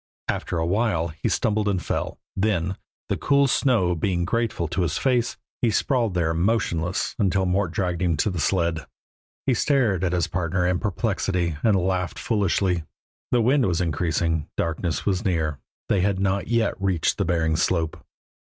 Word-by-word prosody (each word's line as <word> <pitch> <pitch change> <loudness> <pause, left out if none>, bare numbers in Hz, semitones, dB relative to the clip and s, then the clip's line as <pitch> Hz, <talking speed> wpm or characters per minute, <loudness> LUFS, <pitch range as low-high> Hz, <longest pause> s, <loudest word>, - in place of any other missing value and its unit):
After - - -2
a 80 - 0
while 90 -3 +1
he 80 +1 -3
stumbled 110 -2 +1
and 100 -3 +1
fell, - - -3 0.2
then, 95 -2 0 0.3
the - - -1
cool 140 0 +3
snow 125 -9 +2
being 85 +1 0
grateful 115 -5 -1
to 85 +2 -1
his 85 -2 0
face, 125 -3 +1 0.2
he 120 - +3
sprawled 115 -2 +1
there 85 -2 +1
motionless 85 -2 0
until 95 -2 +2
Mort 95 +1 +1
dragged 90 -1 -1
him 85 -4 +1
to 105 - +1
the 90 - -3
sled. 85 -2 0 0.6
He 135 - +3
stared 120 - +2
at 90 - +1
his 90 -3 +2
partner 90 +1 -1
in 90 0 +1
perplexity 95 -5 -1
and 110 -3 +3
laughed 90 -2 0
foolishly. 95 -5 +1 0.5
The 120 - +3
wind 130 +2 +3
was 85 -2 0
increasing, 80 -1 0
darkness 80 -1 -1
was 95 0 0
near, 80 -7 0 0.3
they 95 - +2
had 95 0 +1
not 95 +1 0
yet 115 -2 +1
reached 95 -5 +1
the - - +2
Bering 80 -2 +1
slope. 80 0 0
90 Hz, 170 wpm, -24 LUFS, 85-105 Hz, 0.6 s, cool